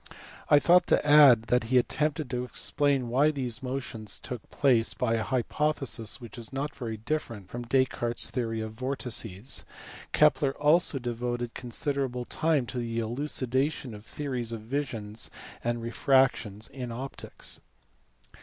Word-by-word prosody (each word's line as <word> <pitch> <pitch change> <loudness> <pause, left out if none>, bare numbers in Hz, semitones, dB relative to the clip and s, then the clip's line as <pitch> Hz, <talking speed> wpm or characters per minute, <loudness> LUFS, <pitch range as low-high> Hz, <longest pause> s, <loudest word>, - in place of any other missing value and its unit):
I 145 - +8
ought 175 0 +6
to - - +3
add 145 -6 +8
that 125 -2 +3
he 125 +3 +3
attempted 150 +3 +1
to 125 -1 -1
explain 135 +1 0
why 135 +6 +3
these 130 -5 -3
motions 125 -5 -4
took 125 -4 -8
place 120 -5 +2
by 120 -2 0
a 115 - +1
hypothesis 130 -1 0
which 120 0 -10
is 115 - -6
not 140 +2 -3
very 115 -5 -4
different 110 -5 -4
from 120 0 -6
Descartes 120 -2 +1
s - - 0
theory 115 -3 -2
of 110 0 -4
vortices. 120 -3 -2 0.5
Kepler 135 -1 +3
also 150 0 +3
devoted 120 -1 -3
considerable 125 0 -2
time 155 -3 +1
to 125 - -4
the 115 -1 -3
elucidation 130 +2 -1
of 105 - -9
the 110 - -18
theories 125 -5 -3
of 115 -2 -5
vision 115 -4 -4 0.5
and 120 0 -1
refraction 115 -4 +2
in 125 -3 -5
optics. 130 +4 -6
125 Hz, 145 wpm, -28 LUFS, 115-140 Hz, 0.5 s, I